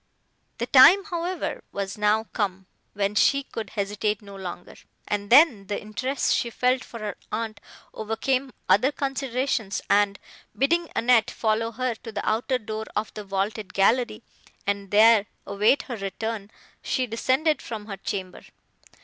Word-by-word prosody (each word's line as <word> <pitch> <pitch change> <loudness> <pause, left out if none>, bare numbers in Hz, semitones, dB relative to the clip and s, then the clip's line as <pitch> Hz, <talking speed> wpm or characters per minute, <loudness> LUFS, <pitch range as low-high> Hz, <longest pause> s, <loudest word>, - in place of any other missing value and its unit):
The 235 - -2
time, 280 +11 +8
however, 350 0 -3
was 195 -1 -4
now 210 +1 +2
come, 190 -3 -2 0.3
when 200 0 -1
she 275 +6 +3
could 225 -6 -7
hesitate 210 +1 -1
no 200 -1 -11
longer: 180 -2 -7 0.3
and 205 -1 -2
then 245 - +6
the 205 - -2
interest 255 +6 -1
she 235 - 0
felt 250 +2 +1
for 230 - -10
her 210 -1 -4
aunt 220 -1 -3 0.3
overcame 255 +5 -1 0.2
other 205 +9 +4
considerations, 265 -6 -2
and, 200 -1 +3 0.4
bidding 335 +5 +1
Annette 235 -1 +4
follow 225 +1 -1
her 255 +1 -1
to 225 0 -10
the 205 -1 -5
outer 240 +4 +1
door 220 -1 -5
of 210 +1 -2
the 210 - -7
vaulted 200 +1 -3
gallery, 225 +3 +2 0.4
and 200 -1 -2
there 215 0 +6 0.2
await 210 +7 +2
her 245 -4 -6
return, 205 +1 -4 0.3
she 255 - -1
descended 260 +7 +1
from 220 -3 -7
her 200 -2 -7
chamber. 190 -1 -5
220 Hz, 150 wpm, -25 LUFS, 205-255 Hz, 0.4 s, time